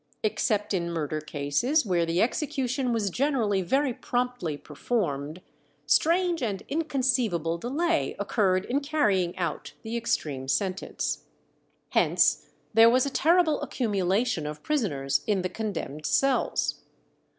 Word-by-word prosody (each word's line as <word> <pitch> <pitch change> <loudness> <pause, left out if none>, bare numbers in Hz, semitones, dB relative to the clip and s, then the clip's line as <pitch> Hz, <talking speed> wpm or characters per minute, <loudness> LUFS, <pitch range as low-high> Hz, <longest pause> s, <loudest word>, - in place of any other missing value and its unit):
Except 210 -1 0
in 170 -2 -1
murder 155 -2 -2
cases, 155 - 0
where 175 -4 +1
the 170 +2 +2
execution 260 -1 -1
was 215 -4 0
generally 235 -6 +1
very 265 +8 +1
promptly 245 -12 -2
performed, 150 - -3 0.4
strange 345 0 +3
and 205 -6 -2
inconceivable 250 - 0
delay 325 - 0
occurred 195 -2 +1
in 265 +3 0
carrying 210 - +1
out 170 -4 -3
the 225 +1 -4
extreme 150 - -2
sentence. 190 +6 -2 0.6
Hence - - +2 0.2
there 225 +1 +8
was 255 +2 +3
a 280 - -2
terrible 325 +1 +3
accumulation 200 - 0
of 150 0 -7
prisoners 160 - 0
in 200 -4 +1
the 185 - -1
condemned 170 -9 -4
cells. 270 -1 +1
215 Hz, 120 wpm, -27 LUFS, 170-265 Hz, 0.6 s, there